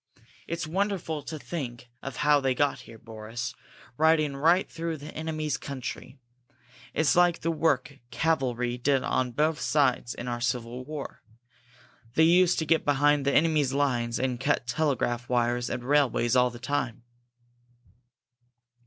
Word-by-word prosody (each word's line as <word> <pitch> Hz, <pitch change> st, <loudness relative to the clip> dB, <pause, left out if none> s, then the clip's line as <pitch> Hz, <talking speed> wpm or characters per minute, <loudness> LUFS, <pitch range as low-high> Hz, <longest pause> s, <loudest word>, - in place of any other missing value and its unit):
It's 170 Hz, 0 st, -3 dB
wonderful 175 Hz, -3 st, -2 dB
to 155 Hz, -, -6 dB
think 125 Hz, -4 st, -6 dB
of 135 Hz, -3 st, -6 dB
how 150 Hz, +1 st, +4 dB
they 135 Hz, -2 st, 0 dB
got 145 Hz, +2 st, +1 dB
here, 115 Hz, -, -12 dB
Boris, 115 Hz, +2 st, -6 dB, 0.4 s
riding 155 Hz, -2 st, +3 dB
right 165 Hz, +7 st, +3 dB
through 165 Hz, -1 st, -4 dB
the 150 Hz, +1 st, -10 dB
enemy's 155 Hz, -2 st, -2 dB
country! 130 Hz, -1 st, -7 dB, 0.8 s
It's 155 Hz, 0 st, +3 dB
like 175 Hz, -1 st, +3 dB
the 165 Hz, -, 0 dB
work 145 Hz, -3 st, 0 dB
cavalry 125 Hz, -6 st, 0 dB
did 135 Hz, +1 st, +2 dB
on 130 Hz, -1 st, 0 dB
both 150 Hz, +5 st, +1 dB
sides 130 Hz, -5 st, +1 dB
in 125 Hz, -, -6 dB
our 120 Hz, -1 st, -3 dB
Civil 120 Hz, 0 st, -2 dB
War. 150 Hz, -1 st, -7 dB, 0.9 s
They 160 Hz, -, +5 dB
used 175 Hz, +2 st, +5 dB
to 160 Hz, -, 0 dB
get 160 Hz, +1 st, +2 dB
behind 145 Hz, 0 st, +3 dB
the 140 Hz, -, +2 dB
enemy's 150 Hz, -3 st, +3 dB
lines 120 Hz, -4 st, 0 dB
and 125 Hz, -2 st, -1 dB
cut 135 Hz, -2 st, 0 dB
telegraph 120 Hz, -3 st, -1 dB
wires 120 Hz, 0 st, +1 dB
and 120 Hz, -, -4 dB
railways 130 Hz, -3 st, +2 dB
all 125 Hz, 0 st, +4 dB
the 120 Hz, -, -10 dB
time." 120 Hz, -2 st, -3 dB
140 Hz, 145 wpm, -27 LUFS, 125-155 Hz, 0.9 s, They